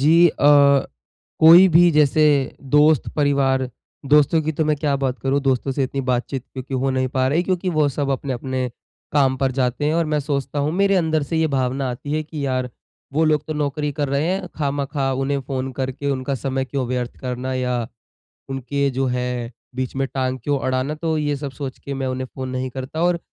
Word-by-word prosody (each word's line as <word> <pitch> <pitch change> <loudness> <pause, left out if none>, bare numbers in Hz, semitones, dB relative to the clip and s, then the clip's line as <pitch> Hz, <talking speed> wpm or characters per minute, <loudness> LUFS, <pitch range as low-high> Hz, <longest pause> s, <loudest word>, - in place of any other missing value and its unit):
जी 155 +4 +5
अ, 140 -2 +5 0.6
कोई 170 +4 +9
भी 175 0 +7
जैसे 150 0 +3 0.5
दोस्त, 150 -2 +4
परिवार 135 -3 +2 0.4
दोस्तों 150 +2 +4
की 155 - -1
तो 160 +1 0
मैं 150 0 +1
क्या 145 -1 0
बात 135 -1 -2
करूँ 135 +1 +1
दोस्तों 135 0 0
से 135 - -1
इतनी 135 +1 -3
बातचीत 125 0 -2
क्योंकि 130 0 -6
हो 135 +1 0
नहीं 130 0 0
पा 130 0 0
रही, 165 +5 +2
क्योंकि 185 0 -1
वो 150 - +4
सब 140 0 -2
अपने 135 0 -2
अपने 130 0 -3 0.4
काम 135 -3 +3
पर 135 0 0
जाते 130 +2 -1
हैं 150 - +1
और 170 0 +2
मैं 150 -1 0
सोचता 140 0 -3
हूँ, 145 +2 0
मेरे 195 +2 +2
अंदर 160 -3 +1
से 165 - 0
ये 160 0 +2
भावना 130 +1 0
आती 145 +4 -6
है 155 0 0
कि, 150 -1 -6
यार 130 -1 -1 0.4
वो 160 +3 +2
लोग 150 -1 +2
तो 155 - -3
नौकरी 150 0 -2
कर 145 0 -2
रहे 140 +3 0
है 190 0 -1
खामखा 140 -2 -1
उन्हें 135 +1 -1
फ़ोन 135 0 -4
करके 135 +2 -2
उनका 135 +1 -2
समय 135 0 -2
क्यों 130 -1 -3
व्यर्थ 125 -1 -3
करना 130 0 -3
या 125 -1 -1 0.7
उनके 135 +2 -1
जो 130 +1 -1
है, 125 -1 -2 0.2
बीच 130 -1 -3
में 135 0 0
टाँग 130 -1 -1
क्यों 145 -1 +1
अड़ाना 130 +2 -1
तो 160 0 -2
ये 145 -1 -1
सब 140 0 -5
सोच 130 0 -6
के 140 - -6
मैं 135 -1 -3
उन्हें 130 0 -3
फ़ोन 130 -1 -5
नहीं 130 0 -3
करता। 130 +5 -5
और 175 -1 +2
140 Hz, 210 wpm, -21 LUFS, 130-150 Hz, 0.7 s, कोई